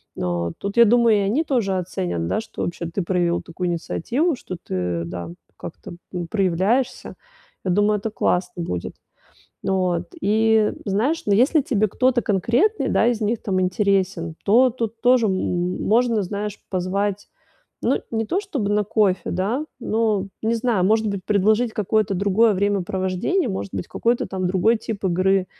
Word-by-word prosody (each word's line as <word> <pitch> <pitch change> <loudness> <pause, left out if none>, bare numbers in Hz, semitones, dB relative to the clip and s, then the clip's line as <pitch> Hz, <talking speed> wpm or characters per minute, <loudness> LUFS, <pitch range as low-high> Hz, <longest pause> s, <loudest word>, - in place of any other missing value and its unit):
э, 85 -1 -2
тут, 200 +3 -5
я 235 - +8
думаю, 230 -1 +4
и - - +2
они 210 +11 +1
тоже 220 -10 0
оценят, 85 - -3
да, - - 0
что, 220 - -8
вообще, 170 0 -4
ты 170 +4 -3
проявил 175 -1 0
такую 180 +2 -5
инициативу, 245 - -1
что 185 - -7
ты, 90 -2 -2
да, 85 0 -6 0.3
как-то, - - -9 0.2
ну, 175 -2 -4
проявляешься. 200 +6 0 0.5
Я 185 - +1
думаю, 205 +3 +3
это 215 +1 -4
классно 180 -3 -1
будет. 90 - -4 0.7
Вот, 180 -3 0
и, 220 +1 +3
знаешь, 230 +12 0
но 205 - +3
если 280 +7 +4
тебе 215 -5 +1
кто-то 255 +4 +1
конкретный, 235 - +1
да, - - +3
из 235 -2 0
них, 220 +2 0
там, 185 -2 0
интересен, 185 -3 0
то 245 +6 +5
тут 230 -1 -4
тоже, 245 -2 +4
м, 180 -2 -1
можно, 230 -1 +2
знаешь, 205 +2 -4
позвать, 195 +2 -2 0.6
ну, - - +1
не 225 -1 -1
то 370 - 0
чтобы 290 - -3
на 210 0 +2
кофе, 200 -3 +1
да, 210 - -1 0.2
но, 215 -4 0 0.2
не 225 +1 +1
знаю, 225 -5 +1
может 220 +2 +2
быть, 200 -2 -4
предложить 215 +3 +2
какое-то 210 -1 0
другое 200 +4 +3
времяпровождение, 195 - 0
может 190 0 -4
быть, - - -3
какой-то, 235 +1 0
там, 185 -1 -3
другой 215 +5 +2
тип 215 -3 -6
игры, 185 +1 +2
200 Hz, 160 wpm, -22 LUFS, 185-225 Hz, 0.7 s, я